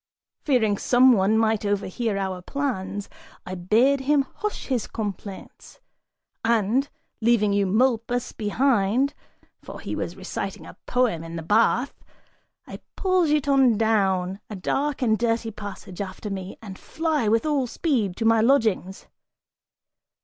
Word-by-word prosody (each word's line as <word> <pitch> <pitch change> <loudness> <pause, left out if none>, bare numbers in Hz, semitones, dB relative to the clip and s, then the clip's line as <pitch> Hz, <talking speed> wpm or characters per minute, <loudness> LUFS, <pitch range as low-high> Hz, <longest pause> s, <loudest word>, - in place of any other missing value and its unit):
Fearing 220 -8 +1
some 255 +1 +5
one 205 +1 +3
might 220 -1 +1
overhear 205 +1 -1
our 190 -2 -3
plans, 205 -5 -3 0.4
I 185 - -6
bade 220 +10 +2
him 280 +1 +2
hush 420 0 -4
his 250 -5 -1
complaints 205 -2 -7 0.6
and, 230 +4 +1 0.3
leaving 220 -3 +3
Eumolpus 230 +4 +1
behind 235 +3 +1 0.5
for - - -9
he - - -5
was - - -4
reciting - - -5
a - - -11
poem 245 -10 +1
in 165 0 -8
the 165 - -5
bath 230 - +2 0.7
I - - -9 0.2
pull 370 -3 +2
Giton 275 -5 +3
down 195 -4 +1
a 210 - -6
dark 270 +9 -1
and 220 -3 +2
dirty 230 -1 0
passage, 205 -3 -8
after 200 +2 -6
me, 190 -1 -6
and 195 -3 -9
fly 315 -7 -1
with 225 +4 +2
all 285 -4 +1
speed 230 - -1
to 225 - -2
my 225 0 +4
lodgings. 220 -7 +1
225 Hz, 135 wpm, -24 LUFS, 200-260 Hz, 0.7 s, some